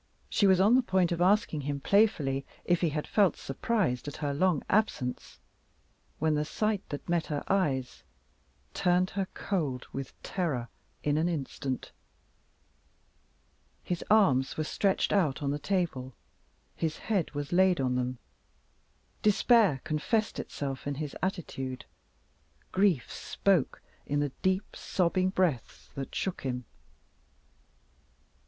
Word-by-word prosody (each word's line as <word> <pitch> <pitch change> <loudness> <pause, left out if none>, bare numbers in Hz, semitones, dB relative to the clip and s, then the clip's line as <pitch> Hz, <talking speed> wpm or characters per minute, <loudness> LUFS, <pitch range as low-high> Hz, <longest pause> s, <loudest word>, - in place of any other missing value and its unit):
She 200 - +4
was 190 -1 +5
on 205 +5 +5
the 260 - +6
point 190 -7 +1
of 170 0 -1
asking 185 -5 +3
him 140 0 -3
playfully 145 -7 +2 0.2
if 175 -1 +2
he 170 - +3
had 150 0 -3
felt 200 -6 +3
surprised 135 - -1
at 145 - -5
her 145 -2 -2
long 170 0 +2
absence 190 - -1 0.8
when 155 0 +1
the 150 0 +1
sight 215 +5 -1
that 145 - -6
met 170 -1 0
her 150 -3 -2
eyes 140 -10 0 0.7
turned 180 +1 +2
her 195 0 -2
cold 145 -10 -2
with 135 -1 -6
terror 145 -10 -2 0.3
in 150 +1 +2
an 165 +2 +1
instant. 135 -4 -4 1.9
His 175 -1 -3
arms 140 -12 +4
were 155 - 0
stretched 195 +5 +1
out 160 -8 +1
on 140 - 0
the 145 - -2
table; 150 -9 -2 0.6
his 160 -2 -2
head 200 -7 -1
was 145 0 -4
laid 185 -1 +4
on 130 -2 +1
them, 125 0 -1 1.0
despair 210 - +4
confessed 210 +9 0
itself 135 -1 -5
in 145 - -1
his 150 0 -5
attitude; 135 -9 -3 0.9
grief 185 -9 +2
spoke 190 -8 0 0.2
in 145 +1 0
the 145 0 +1
deep 190 +1 0
sobbing 185 0 +1
breaths 180 - -1
that 135 -1 -6
shook 190 - -2
him. 125 -2 -3
160 Hz, 135 wpm, -29 LUFS, 140-190 Hz, 1.9 s, the